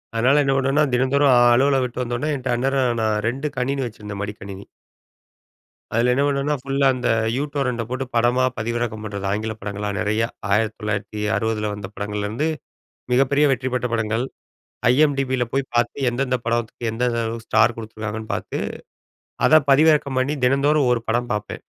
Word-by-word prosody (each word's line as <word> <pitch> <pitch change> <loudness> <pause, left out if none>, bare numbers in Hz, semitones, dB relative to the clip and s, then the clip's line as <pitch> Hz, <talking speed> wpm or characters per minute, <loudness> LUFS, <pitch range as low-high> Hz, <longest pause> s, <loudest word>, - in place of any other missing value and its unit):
அதனால 130 +6 +4
என்ன 135 - +2
பண்ணுவேனா 135 +3 +2
தினந்தோறும் 135 +2 +3 0.2
அலுவல 135 +3 +3
விட்டு 125 0 -4
வந்த 120 0 -3
உடனே 150 +4 -1 0.2
அந்நேரம் 130 -2 +1
நான் 110 -1 +1
2 135 +5 -3
கணினி 135 +2 -1
வச்சிருந்தேன் 105 -3 -8
மடிக்கணினி 100 -1 -8 1.3
அதில 115 +2 +2
என்ன 140 - +2
பண்ணுனா, 140 +1 0
ஃபுல்லா 135 +1 0
அந்த 125 -1 -2 0.3
யூ 140 - 0
டோரண்டை 125 -4 -1
போட்டு 130 +2 -3
படமா 120 +2 +3
பதிவிறக்கம் 115 -1 -2
பண்ணுறது, 100 -2 -4
ஆங்கிலப் 110 +1 -3
படங்களா 105 +1 -4
நிறைய 110 +2 0 0.3
1960ல 105 0 -1
வந்த 100 -2 -7
படங்கள்லேருந்து 105 +6 -3 0.7
மிகப்பெரிய 135 +3 +3
வெற்றி 130 0 0
பெற்ற 125 -1 0
படங்கள், 110 +1 0 0.7
ஐஎம்டிபி 135 -1 +2
யில 120 - +1
போய் 135 -1 -1
பார்த்து, 120 0 +1
எந்தெந்த 130 +1 -1
படத்துக்கு 115 0 -2
எந்தெந்த 120 +1 0
அளவு 115 0 -5
ஸ்டார் 115 0 +3
கொடுத்துருக்காங்கன்னு 110 -1 -6
பார்த்து, - - -4 0.9
அதை 155 0 +7
பதிவிறக்கம் 145 -2 +4
பண்ணி 140 +4 0
தினந்தோறும் 140 +1 +3
ஒரு 115 -2 0
படம் 120 +2 0
பார்ப்பேன். 105 -2 -5
120 Hz, 145 wpm, -22 LUFS, 110-135 Hz, 1.3 s, அதை